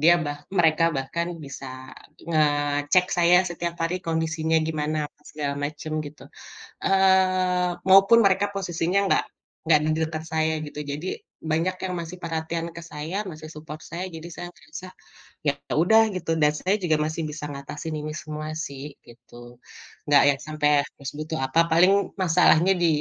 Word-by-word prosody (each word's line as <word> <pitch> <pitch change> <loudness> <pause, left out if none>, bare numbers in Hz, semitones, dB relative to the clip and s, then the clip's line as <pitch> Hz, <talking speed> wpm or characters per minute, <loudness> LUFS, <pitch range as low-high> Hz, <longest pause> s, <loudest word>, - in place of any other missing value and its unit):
dia 170 +3 +7
bah 145 0 -4 0.2
mereka 165 -1 +4
bahkan 170 +6 -2 0.2
bisa 135 -1 -8 0.6
ngecek 145 +2 +2
saya 175 0 +5
setiap 170 0 -3
hari 170 +2 -1
kondisinya 160 0 0
gimana, 155 -1 -2
apa - - -41
segala 145 -2 -3
macem 155 +1 -5
gitu. 145 +1 -12 0.6
Eee, 185 -1 +3 0.2
maupun 195 +4 +7
mereka 195 +1 +3
posisinya 180 -1 -1
nggak - - +2 0.4
nggak 160 -2 +5
di - - +1
dekat 160 0 -5
saya 160 0 +1
gitu. 150 - -7
Jadi, 150 +6 -5 0.4
banyak 165 +4 +1
yang 180 - -3
masih 170 +2 -7
perhatian 165 0 -3
ke 170 - -7
saya, 160 +3 -6
masih 155 -1 -10
support 155 0 -8
saya, 175 +2 -6
jadi 160 0 -9
saya 175 0 -6
merasa, 150 +6 -10 0.6
ya 145 - +4 0.3
udah 220 +5 +6
gitu. 180 -3 -4
Dan 150 0 +5
saya 190 +2 +1
juga 160 -3 +2
masih 155 +1 -3
bisa 150 0 -7
mengatasi 140 +2 -7
ini 150 0 -4
semua 155 0 -6 0.2
sih, 140 0 -8 0.2
gitu. 120 0 -18 0.8
Nggak 145 -1 +7
yang 135 - -11
sampai 150 -1 0 0.3
terus 140 -1 -6
butuh 155 +1 -4
apa 130 +5 +2
paling 180 +4 +6 0.3
masalahnya 180 +1 +5
di - - +5
160 Hz, 155 wpm, -25 LUFS, 150-175 Hz, 0.8 s, dia